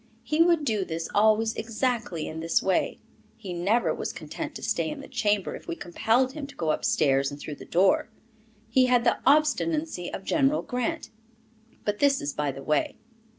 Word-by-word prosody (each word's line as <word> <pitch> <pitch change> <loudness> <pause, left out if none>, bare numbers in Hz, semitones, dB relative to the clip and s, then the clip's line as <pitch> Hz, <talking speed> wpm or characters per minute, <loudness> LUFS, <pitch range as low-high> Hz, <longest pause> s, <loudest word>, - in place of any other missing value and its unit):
He 310 +1 +1
would 335 -3 +4
do 215 -6 +1
this 165 -2 -4
always 220 +2 +3
exactly 225 - -2
in 160 - -6
this 165 +1 +2
way; 190 -1 +1 0.4
he 200 -5 -7
never 195 +8 +1
was - - -4
content - - -7
to - - -8
stay - - 0
in 300 -1 -6
the - - -9
chamber 210 -6 0
if - - -12
we - - -3
compelled 225 +10 +1
him 285 -1 -6
to 280 - -14
go 160 -2 0
upstairs 140 -3 +2
and 145 - -9
through 145 0 -7
the - - -11
door. 190 +4 +2 0.6
He 255 +3 +3
had 245 -1 +3
the 235 - +2
obstinacy 305 - +2
of 195 - -6
General 280 +5 +2
Grant. 250 -2 -3 0.7
But 210 0 -1
this 280 -1 +4
is 140 0 -3
by 145 -1 -1
the 135 +1 -9
way. 150 -1 0
220 Hz, 190 wpm, -26 LUFS, 170-265 Hz, 0.7 s, would